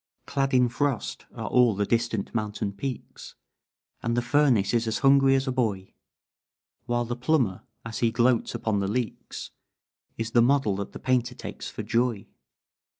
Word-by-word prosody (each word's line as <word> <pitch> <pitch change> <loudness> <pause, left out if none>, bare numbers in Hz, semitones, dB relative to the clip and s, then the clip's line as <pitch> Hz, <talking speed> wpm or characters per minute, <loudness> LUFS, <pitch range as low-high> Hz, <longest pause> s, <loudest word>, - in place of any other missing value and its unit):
"Clad 135 -1 0
in 125 -1 +5
frost 135 0 -2
are - - -5
all 125 -4 +4
the 100 +1 0
distant 115 -2 -1
mountain 105 -2 -2
peaks, 130 +6 -7 0.7
And 115 +1 -1
the 120 - +1
furnace 125 -6 +3
is 115 -1 +1
as 110 - 0
hungry 135 0 +6
as 135 0 +1
a - - +1
boy; 105 -7 -1 0.9
While 120 0 0
the 120 +1 -3
plumber, 125 -6 +1 0.2
as 115 -1 -5
he 115 - +3
gloats 120 +1 +2
upon 110 -2 0
the 100 - -1
leaks, 115 +2 -4 0.7
Is 115 0 -3
the 120 - +5
model 125 -5 +3
that 100 - -5
the - - -6
painter 125 -1 0
takes - - -7
for - - -6
'Joy.' 115 -4 0
120 Hz, 165 wpm, -26 LUFS, 110-130 Hz, 0.9 s, hungry